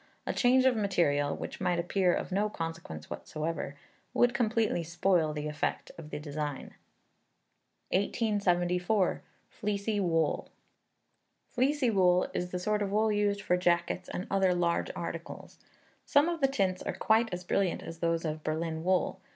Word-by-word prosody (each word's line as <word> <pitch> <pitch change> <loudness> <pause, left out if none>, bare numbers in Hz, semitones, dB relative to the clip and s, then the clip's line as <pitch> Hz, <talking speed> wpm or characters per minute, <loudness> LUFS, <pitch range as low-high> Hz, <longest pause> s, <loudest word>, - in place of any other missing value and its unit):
A - - -1
change 255 +1 +4
of 260 -2 +4
material, 155 -9 +1
which - - -7
might 175 -1 +1
appear 180 +1 +2
of - - -2
no 205 +3 +1
consequence 165 - -6
whatever, 155 -2 -4 0.4
would 245 0 +4
completely 225 -5 +1
spoil 170 -1 +1
the 150 0 -4
effect 150 -1 -2
of 160 -2 -10
the - - -4
design. 150 -1 -5 1.2
1874. 185 -2 +1 0.3
Fleecy 205 0 -2
Wool. 165 -4 0 1.0
Fleecy 260 0 +1
wool 180 -3 +4
is 180 - -2
the 180 - -3
sort 210 +3 0
of 200 - 0
wool 215 +1 +2
used 205 -1 +1
for 180 - +2
jackets 175 0 0
and 185 - -4
other 190 -2 +3
large 170 -1 +1
articles. - - -7 0.4
Some 290 +3 +4
of 340 -2 -2
the 270 - +5
tints 195 -9 0
are - - -3
quite 225 +1 +2
as 180 0 -4
brilliant 185 0 0
as 165 - -8
those 165 0 0
of 155 0 -3
Berlin 160 +1 -2
wool. 185 +1 +1
180 Hz, 150 wpm, -30 LUFS, 165-210 Hz, 1.2 s, the